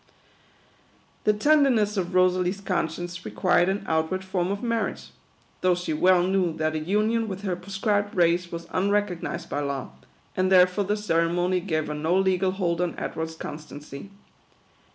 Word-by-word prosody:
The 210 Hz, -, +5 dB
tenderness 245 Hz, -4 st, +3 dB
of 185 Hz, -2 st, -2 dB
Rosalie's 185 Hz, +1 st, +2 dB
conscience 175 Hz, -2 st, -3 dB
required 180 Hz, -1 st, +2 dB
an 195 Hz, +2 st, -2 dB
outward 160 Hz, +4 st, 0 dB
form 185 Hz, -1 st, -1 dB
of 200 Hz, +3 st, -3 dB
marriage; 230 Hz, -3 st, -2 dB, 0.5 s
though 185 Hz, -1 st, +3 dB
she 175 Hz, -2 st, -3 dB
well 180 Hz, +3 st, +4 dB
knew 185 Hz, -2 st, +1 dB
that 155 Hz, 0 st, -1 dB
a 155 Hz, -, -1 dB
union 215 Hz, +7 st, +1 dB
with 195 Hz, -1 st, -6 dB
her 185 Hz, -3 st, -1 dB
proscribed 200 Hz, +3 st, -1 dB
race 175 Hz, 0 st, +2 dB
was 170 Hz, 0 st, -6 dB
unrecog 200 Hz, -2 st, +1 dB
nised 170 Hz, 0 st, -5 dB
by 145 Hz, -, -2 dB
law, 140 Hz, -2 st, -3 dB, 0.4 s
and 185 Hz, 0 st, +1 dB
therefore 185 Hz, +2 st, +5 dB
the 205 Hz, +2 st, 0 dB
ceremony 175 Hz, -1 st, +1 dB
gave 160 Hz, -4 st, -1 dB
her 150 Hz, -, -4 dB
no 160 Hz, +4 st, 0 dB
legal 190 Hz, -1 st, +2 dB
hold 180 Hz, -3 st, -1 dB
on 175 Hz, -1 st, -2 dB
Edward's 160 Hz, 0 st, -4 dB
constancy. 150 Hz, +1 st, -9 dB
180 Hz, 155 wpm, -25 LUFS, 170-200 Hz, 0.5 s, The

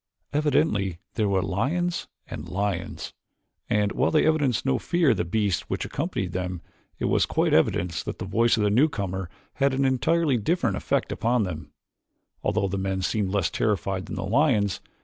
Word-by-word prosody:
Evidently 140 Hz, -, +1 dB, 0.2 s
there 105 Hz, -3 st, +1 dB
were 95 Hz, -2 st, +2 dB
lions 150 Hz, -, -1 dB, 0.2 s
and 80 Hz, +3 st, -7 dB
lions, 95 Hz, -1 st, -3 dB, 0.6 s
and 105 Hz, -1 st, +2 dB
while 135 Hz, -, +1 dB
they 155 Hz, -, +3 dB
evinced 145 Hz, -7 st, +2 dB
no 135 Hz, -2 st, +2 dB
fear 170 Hz, -5 st, +2 dB
of -, -, +1 dB
the -, -, +1 dB
beasts 100 Hz, +1 st, -1 dB
which -, -, -2 dB
accompanied 140 Hz, -, -3 dB
them, 90 Hz, -1 st, -3 dB, 0.4 s
it -, -, -2 dB
was -, -, +2 dB
quite -, -, +1 dB
evident 90 Hz, 0 st, +2 dB
that -, -, -4 dB
the 95 Hz, -, -5 dB
voice 115 Hz, +5 st, +2 dB
of 105 Hz, -, +1 dB
the 105 Hz, -, +2 dB
newcomer 100 Hz, -, +1 dB, 0.3 s
had 135 Hz, -1 st, +3 dB
an 135 Hz, +1 st, +2 dB
entirely 140 Hz, +2 st, +2 dB
different 115 Hz, -, 0 dB
effect -, -, -1 dB
upon 120 Hz, 0 st, +1 dB
them, 85 Hz, -5 st, -6 dB, 0.7 s
although 100 Hz, -1 st, +1 dB
the 95 Hz, +1 st, -2 dB
men 95 Hz, -1 st, -2 dB
seemed 100 Hz, +1 st, 0 dB
less 95 Hz, -3 st, 0 dB
terrified 95 Hz, -2 st, -1 dB
than -, -, -5 dB
the 95 Hz, -1 st, -3 dB
lions. 110 Hz, -4 st, +2 dB
105 Hz, 175 wpm, -25 LUFS, 95-135 Hz, 0.7 s, they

